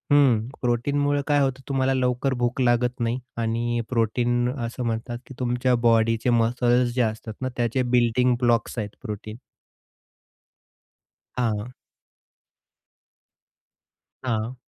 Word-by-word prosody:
हं 135 -6 +5 0.2
प्रोटीनमुळे 145 +4 +1
काय 145 -1 +3
होतं 135 -1 0
तुम्हाला 135 -1 +1
लवकर 130 +1 0
भूक 120 +2 0
लागत 125 0 +2
नाही, 115 +2 0 0.2
आणि 115 +1 -1
प्रोटीन 120 +1 +1 0.2
असं 120 +2 -5
म्हणतात 115 +1 -3
की - - -10
तुमच्या 125 0 +1
बॉडीचे 115 +1 +3
मसल्स 120 +1 +2
जे 125 - +2
असतात 110 -1 -2
ना, 130 - -1
त्याचे 120 +2 +1
बिल्डिंग 125 0 +2
ब्लॉक्स 120 -1 +1
आहेत 105 -1 -3
प्रोटीन. 110 -2 -6 2.0
हां. 115 0 -1 2.5
हां. 115 -1 -2
120 Hz, 110 wpm, -24 LUFS, 115-125 Hz, 2.5 s, हं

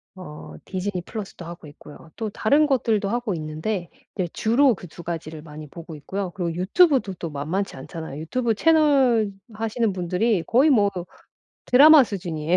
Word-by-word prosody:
어 150 - -10
디즈니 190 -1 -3
플러스도 195 -3 -8
하고 170 -2 -10
있고요. 150 +2 -14
또 220 -2 -3
다른 285 +9 +2
것들도 225 -7 +1
하고 240 -2 -1
있는데 160 +4 -4 0.3
네 185 - -1
주로 245 +3 +3
그 180 - -11
2 170 +2 -12
가지를 160 -2 -6
많이 155 -1 -10
보고 165 +1 -10
있고요. 185 +6 -5
그리고 175 -2 -3
유튜브도 240 - +3
또 170 - -6
만만치 155 +6 -3
않잖아요. 150 +1 -8
유튜브 235 +8 -1
채널 270 -7 +3 0.2
하시는 225 0 -1
분들이 180 +2 0
거의 260 +6 +4
뭐 205 -7 +4 0.8
드라마 295 +4 +8
수준이에요. 175 -5 -2
195 Hz, 360 characters per minute, -23 LUFS, 165-235 Hz, 0.8 s, 드라마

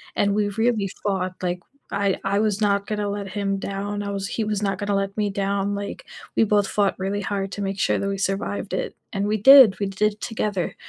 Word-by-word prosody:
and 200 0 +2
we 210 -1 +1
really 220 -1 0
fought, 190 -2 -1
like 180 0 -1 0.3
I 200 -1 +1
I 200 +1 +1
was 210 -2 +1
not 200 -1 +1
gonna 210 -1 -2
let 200 0 -4
him 195 0 -1
down. 200 +1 -3
I 200 - -4
was 195 -1 -3
he 225 - -2
was 210 -1 -1
not 195 -1 0
gonna 205 -1 -1
let 195 +1 -2
me 210 -1 +1
down, 200 0 -1
like, 200 0 -6 0.3
we - - +4
both 205 -1 +2
fought 200 -1 +1
really 195 +2 -2
hard 195 -2 -3
to 205 - -5
make 195 0 -3
sure - - +2
that 200 - -2
we 195 - -2
survived 195 +1 -2
it. - - -2 0.2
And 200 0 -1
we 215 +1 +1
did, 250 -3 +8
we 200 - 0
did 210 +2 -1
together. 210 -6 -2
200 Hz, 225 wpm, -23 LUFS, 195-210 Hz, 0.3 s, did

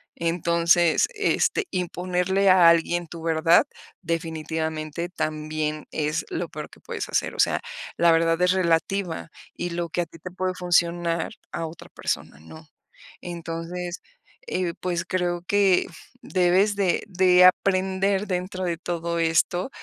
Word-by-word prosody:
Entonces, 170 0 +2
este, 430 - +1
imponerle 180 +1 0
a 180 -2 +7
alguien 170 +1 +2
tu 165 0 -9
verdad, 165 - +4 0.4
definitivamente 160 0 -3
también 155 -2 -3
es 155 +1 -1
lo 175 - -3
peor 150 -1 -7
que - - -17
puedes - - -5
hacer. - - 0
O - - -11
sea, - - +3 0.4
la 170 0 +5
verdad 165 0 +3
es 180 0 +4
relativa, 180 -1 0 0.3
y 175 0 -4
lo 170 0 -3
que 175 - -1
a 170 - -2
ti 165 - -15
te 180 - -7
puede 185 0 -2
funcionar, 170 -1 +1 0.2
a 165 - -3
otra 160 +1 -12
persona 70 - -4
no. 155 - -13 0.5
Entonces, 175 +1 -5 0.5
eh, 180 -2 -1
pues 175 -2 -2
creo 175 -1 -1
que 200 -3 +3 0.3
debes 185 +3 +2
de 195 -3 +1
de 180 -1 +5
aprender 190 +1 +2
dentro 185 0 -3
de 170 -2 -1
todo 170 0 -3
esto, 165 +5 +1
175 Hz, 140 wpm, -24 LUFS, 165-185 Hz, 0.5 s, a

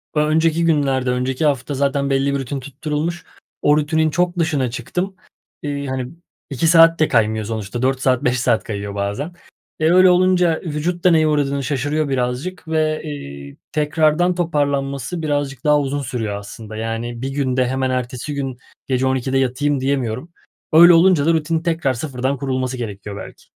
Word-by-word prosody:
ö 150 - +3
önceki 160 +2 +2
günlerde, 135 -5 +1
önceki 125 +4 -1
hafta 145 -1 0
zaten 140 0 0
belli 135 +1 +1
bir 140 - 0
rutin 135 +1 -4
tutturulmuş, 150 +5 -4 0.4
o 145 +1 +4
rutinin 160 +1 +1
çok 175 +3 0
dışına 150 -6 +1
çıktım. 180 +11 -4 0.5
Eee, 145 -1 -3
hani, 130 -1 -3 0.4
2 140 +4 0
saat 165 0 +6
de 155 - +4
kaymıyor 110 -2 +1
sonuçta 110 +2 -4
4 130 0 +1
saat 130 -2 +2
5 125 +1 +1
saat 120 -2 +1
kayıyor 100 -1 -5
bazen. 100 - -3 0.5
E, 160 +2 +3
öyle 185 +1 +7
olunca 180 -2 +3
vücut 170 +2 -3
da 180 - +5
neye 160 -1 +4
uğradığını 140 -2 0
şaşırıyor 145 +2 -1
birazcık 135 +7 -3
ve, 155 -1 0
eee, 70 - -8 0.2
tekrardan 155 +3 +2
toparlanması 140 -2 -1
birazcık 145 -4 -2
daha 150 -1 +4
uzun 145 0 -2
sürüyor 115 -5 -3
aslında, 105 +1 -9
yani, 115 +2 -4
bir 135 - -2
günde 130 -2 0
hemen 130 0 -1
ertesi 125 +2 -3
gün 135 -3 -4 0.3
gece 130 0 +1
00.00'da 130 0 0
yatayım 135 +2 0
diyemiyorum. 135 +2 -2 0.4
Öyle 170 +2 +9
olunca 165 -3 +5
da 165 - +4
rutinin 160 0 0
tekrar 160 -6 0
sıfırdan 130 +1 -2
kurulması 130 -1 -2
gerekiyor 105 -3 -6
belki. - - -10
140 Hz, 165 wpm, -20 LUFS, 125-155 Hz, 0.5 s, Öyle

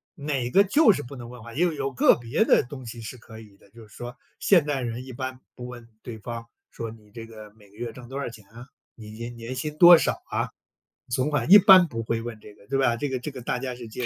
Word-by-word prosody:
哪 140 -5 -2
个 195 +9 +5
就 215 +3 +5
是 145 - -4
不 130 +2 -10
能 120 -1 -9
问 120 -3 -11
话， 115 - -11
也 155 - -2
有 140 -5 -2
个 125 - +5
别 120 - 0
的 - - +4
东 130 -1 -10
西 115 +1 -8
是 115 +3 -8
可 110 -1 -13
以 105 -3 -17
的， - - -23
就 115 -1 -14
是 105 - -20
说 120 +1 -8 0.2
现 175 -7 +4
代 145 -3 -1
人 120 +1 -4
一 130 - -10
般 130 +1 -6
不 125 0 -8
问 120 -2 -11
对 115 -3 -7
方 115 +1 -7 0.3
说： 115 -1 -6
“你 110 -2 -15
这 115 0 -9
个 110 -2 -12
每 105 -2 -20
个 100 - -23
月 120 +1 -5
挣 120 +1 -12
多 135 +2 -7
少 140 - -3
钱 105 -4 -14
啊， 120 +3 -12 0.3
你 105 -2 -11
年 115 +2 -7
年 115 +2 -7
薪 150 +4 -5
多 175 +1 +10
少 - - -1
啊、 - - -2 0.6
存 130 +4 0
款？ 150 +3 -1
“一 205 - +12
般 190 -2 +8
不 115 -5 -5
会 115 0 -2
问 115 -2 -7
这 105 - -14
个 100 - -21
对 135 0 -1
吧？ 120 -3 +2
这 140 +4 -3
个 130 -1 -2
这 140 - -5
个 130 - -9
大 125 +1 -2
家 130 -1 -4
是 120 -2 -10
接 120 +2 -4
120 Hz, 295 characters per minute, -25 LUFS, 115-135 Hz, 0.6 s, 一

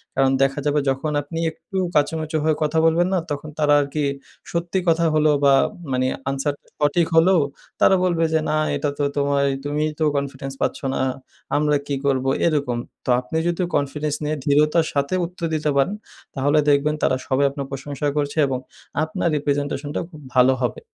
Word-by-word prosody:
কারণ 135 0 +3
দেখা 135 +2 +2
যাবে 150 0 +2
যখন 135 +3 -1
আপনি 165 +3 -6
একটু 190 +4 -8 0.2
কাচুমাচু 155 +1 +1
হয়ে 155 0 +2
কথা 155 +1 0
বলবেন 170 +2 +3
না, 185 - +3
তখন 145 +1 -4
তারা 150 -1 +4
আরকি 145 +1 -2 0.5
সত্যি 170 +2 -1
কথা 165 0 +3
হলেও 155 -1 +4
বা 140 - +6 0.4
মানে 130 0 +1 0.2
আনসার 135 +2 -1 0.3
সঠিক 150 +3 +2
হলেও 175 +2 +5 0.4
তারা 190 - +6
বলবে 170 -2 +1
যে, 160 - +4
"না 155 - +1 0.2
এটা 145 - -1
তো 145 - 0
তোমায় 140 0 +2
তুমিই 150 +2 -1
তো - - +1
কনফিডেন্স 135 -1 -4
পাচ্ছ - - 0 0.2
না। - - -1 0.6
আমরা 150 0 +2
কি 140 - -1
করবো?" 135 -1 +1 0.2
এরকম। 140 -7 0 0.3
তো - - -4
আপনি 125 +6 -4
যদি 175 +1 -1
কনফিডেন্স 145 +1 -1
নিয়ে 150 +1 -1
ধৃঢ়তার 150 +3 +3
সাথে 140 +3 0
উত্তর 170 0 -6
দিতে 155 -1 0
পারেন, 140 +9 +2 0.4
তাহলে 145 +3 +2
দেখবেন 145 +1 +3
তারা - - +3
সবাই 135 +1 +2
আপনার 140 0 -5
প্রশংসা 140 +1 -4
করছে 145 +1 -1
এবং 130 -1 -2 0.4
আপনার 160 +2 -1
এই - - -3
প্রেজেন্টেশনটা 145 0 -1
খুব 155 -4 -13
ভালো 130 +1 +6
হবে। 125 - -1
145 Hz, 180 wpm, -22 LUFS, 140-160 Hz, 0.6 s, বা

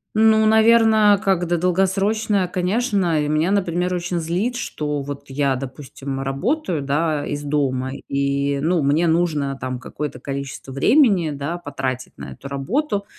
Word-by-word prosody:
Ну, 220 0 +5
наверно, 220 -2 +5
как 190 -3 +1
да 175 +1 +1
долгосрочная, 195 +3 +1
конечно. 185 -2 0
И - - -2
меня, 155 +4 +1
например, 180 -2 0
очень 175 0 -2
злит, 180 +10 -1
что 150 -10 -3
вот 140 0 -7
я, 135 -1 0
допустим, 135 +1 -6
работаю, 170 - -1
да, 145 +1 0
из 145 0 -4
дома 135 -3 -1 0.2
и, 140 0 0
ну, 170 +1 +1
мне 145 +5 +2
нужно, 155 -5 0
там, 130 -1 -4
какое-то 150 +3 -6
количество 140 -1 -6
времени, 185 - +3
да, 145 +4 -4
потратить 135 -6 -5
на - - -8
эту 140 - -10
работу. 200 - -2
165 Hz, 145 wpm, -21 LUFS, 140-195 Hz, 0.2 s, Ну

